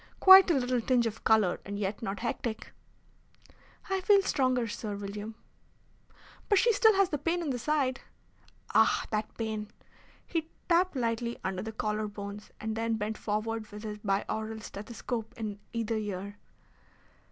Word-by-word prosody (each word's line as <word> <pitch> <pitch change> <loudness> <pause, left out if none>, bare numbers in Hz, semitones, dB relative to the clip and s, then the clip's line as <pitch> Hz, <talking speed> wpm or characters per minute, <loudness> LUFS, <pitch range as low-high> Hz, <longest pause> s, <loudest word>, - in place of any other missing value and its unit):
Quite 380 0 +10
a 335 - +4
little 250 -2 +1
tinge 245 0 +2
of 225 -1 -4
colour, 215 -5 +3
and 200 0 -5
yet 205 0 -3
not 200 -2 -4
hectic." 230 -1 -4 1.1
"I 385 -1 0
feel 395 +1 +5
stronger, 255 -7 +1
Sir 210 -1 -4
William." 205 +2 -6 1.1
"But 410 - +5
she 470 +3 +4
still 440 0 +5
has 390 -1 +3
the 295 - -2
pain 335 +4 0
in 295 - -1
the 245 - -2
side." 270 0 0 0.7
"Ah, - - +4
that 215 0 -2
pain!" 215 -2 -3 0.6
He 325 -2 -3 0.2
tapped 355 0 +3
lightly 235 -1 -1
under 190 0 -2
the 220 +2 -5
collar 215 0 -2
bones, 205 0 -8
and 220 0 -3
then 225 0 0
bent 215 0 -3
forward 215 +1 -2
with 210 +1 -9
his 210 -1 -5
biaural 220 +2 -2
stethoscope 225 +2 -6
in 210 -3 -4
either 230 -1 -1
ear. 205 -1 -5
225 Hz, 155 wpm, -30 LUFS, 210-255 Hz, 1.1 s, Quite